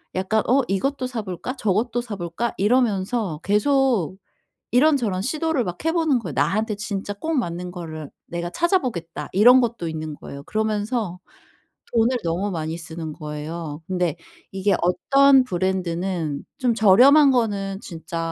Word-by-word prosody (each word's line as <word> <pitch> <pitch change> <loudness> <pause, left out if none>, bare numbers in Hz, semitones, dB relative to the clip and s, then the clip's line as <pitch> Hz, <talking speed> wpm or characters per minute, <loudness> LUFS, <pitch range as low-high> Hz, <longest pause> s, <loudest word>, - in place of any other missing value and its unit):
약간 190 +4 +1
'어 270 +2 +5
이것도 255 +7 -1
사 250 -3 -4
볼까? 185 +6 -5
저것도 220 +4 0
사 230 -4 -6
볼까?' 175 +6 -3
이러면서 205 -5 +1
계속 220 - +2 0.6
이런저런 245 -9 +3
시도를 310 0 0
막 175 -2 -6
해 325 - +3
보는 320 -7 +2
거예요. 175 -10 -6
'나한테 200 - +1
진짜 205 -1 -4
꼭 315 +11 -4
맞는 180 -6 -2
거를 160 -4 -7 0.2
내가 175 0 -4
찾아보겠다.' 250 - -1
이런 245 +6 +7
것도 230 -8 -2
있는 155 -1 -5
거예요. 140 -1 -9
그러면서 215 - -2 0.8
돈을 235 +2 +3
너무 175 +5 -1
많이 160 -1 -3
쓰는 160 -1 -6
거예요. 150 +1 -6
근데 180 -4 0 0.4
이게 195 +1 +1
어떤 275 +9 +4
브랜드는 180 - -2
좀 250 -3 +2
저렴한 260 +8 +7
거는 200 -5 0
진짜 165 -1 -7
200 Hz, 310 characters per minute, -23 LUFS, 170-245 Hz, 0.8 s, 이런